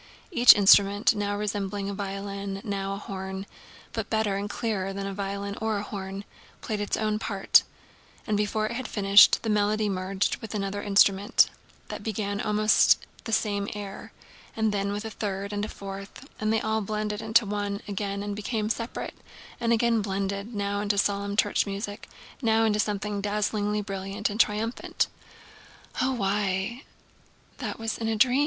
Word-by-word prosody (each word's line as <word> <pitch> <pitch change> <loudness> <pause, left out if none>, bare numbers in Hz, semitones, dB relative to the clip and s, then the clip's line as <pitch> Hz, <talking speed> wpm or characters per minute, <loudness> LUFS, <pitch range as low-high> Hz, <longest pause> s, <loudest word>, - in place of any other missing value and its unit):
Each 245 -8 +8
instrument—now 205 +1 +4
resembling 205 -1 -2
a 200 - -3
violin 195 0 -4
and 195 - -11
now 195 -2 -2
a - - -4
horn, 190 -1 -6 0.5
but - - -3
better 220 -3 +1
and 200 +1 -3
clearer 200 -4 -2
than 195 0 -4
violin 200 0 -4
or 220 -2 0
horn—played 200 +1 -7
its 205 - -1
own 215 -1 0
part, 200 -3 +4 0.6
and 215 - 0
before 210 +1 0
it - - -3
had 250 +2 -4
finished 200 -1 +6
the 225 - -1
melody 210 +1 +2
merged 190 +1 -1
with 220 -1 -7
another 200 0 -2
instrument 200 0 +4 0.4
that - - -5
began 205 -2 -2
almost 215 +1 +4 0.2
the 225 - -4
same 205 -2 0
air, 200 -2 -7 0.4
and 220 -1 +1
then 200 0 -1
with 205 +2 -4
a 220 - -5
third 200 -2 -4
and 205 0 -2
a - - -7
fourth; 195 +6 -8
and 215 0 0
they 225 - +2
all 220 0 0
blended 210 0 -2
into 220 +1 +3
one 205 0 -2
and 200 - -5
again 200 0 -3
became 215 +1 -2
separate 230 +1 -4 0.5
and 235 -1 0
again 230 -1 +3
blended, 200 +2 -3
now 200 0 -1
into 205 -1 0
solemn 200 0 0
church 205 -1 +2
music, 205 +2 -5 0.3
now 225 -2 +3
into 215 -1 +2
something 210 -1 -1
dazzlingly 210 0 0
brilliant 195 +2 -3
and 210 - -5
triumphant. 220 +2 +1 1.0
"Oh—why, 210 -1 0 0.7
that - - -4
was 225 -1 -3
in 225 - -2
a 225 - +1
dream!" 250 +4 +4
205 Hz, 160 wpm, -27 LUFS, 200-215 Hz, 1.0 s, Each